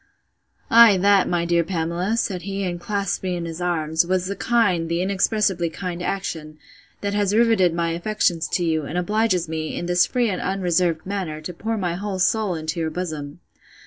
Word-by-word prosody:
Ay, 230 -3 +8
that, 200 0 +4
my 175 -1 0
dear 170 0 +2
Pamela, 175 +4 -2
said 190 -6 -1
he, 200 +1 -4
and 175 -2 -3
clasped 200 +1 -2
me 185 -1 -2
in 170 -1 -4
his 165 +1 -6
arms, 160 -2 +1
was 185 +1 0
the 200 +2 -3
kind, 190 -7 +1
the 170 0 0
inexpressibly 195 -1 +1
kind 175 +1 -5
action, 160 -5 -4 0.4
that 200 0 -2
has 205 0 +1
rivetted 225 -6 +4
my 170 -1 0
affections 170 -2 0
to 180 - -1
you, 160 -1 +1
and 160 - -4
obliges 190 -1 +1
me, 155 -1 -4
in - - -3
this 175 0 +3
free 245 -2 +1
and 185 - -3
unreserved 180 -4 0
manner, 185 -6 -4
to 155 +3 -7
pour 225 +6 -3
my 180 -4 -1
whole 195 +2 -4
soul 200 0 +1
into 160 +1 -4
your 160 -1 -1
bosom. 155 -4 -5
180 Hz, 190 wpm, -22 LUFS, 170-200 Hz, 0.4 s, Ay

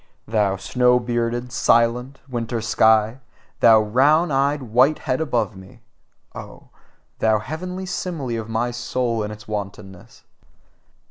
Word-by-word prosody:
Thou 105 -3 +1
snow 125 +5 +2
bearded, 120 0 -2
silent, 120 +3 +1
winter 120 -2 -3
sky, 110 +1 +2 0.4
thou 110 -2 +6
round 145 +9 +3
eyed 140 +1 +1
whitehead 130 +4 +1
above 115 -9 -1
me! 95 +5 -15 0.5
Oh, - - -11 0.5
thou 110 -1 +3
heavenly 180 - -6
simile 160 -10 -4
of 110 - -11
my 115 +2 -1
soul 120 -1 -2
and 105 0 -4
its 105 +1 -11
wantonness! 100 -3 -8
120 Hz, 120 wpm, -21 LUFS, 110-130 Hz, 0.5 s, thou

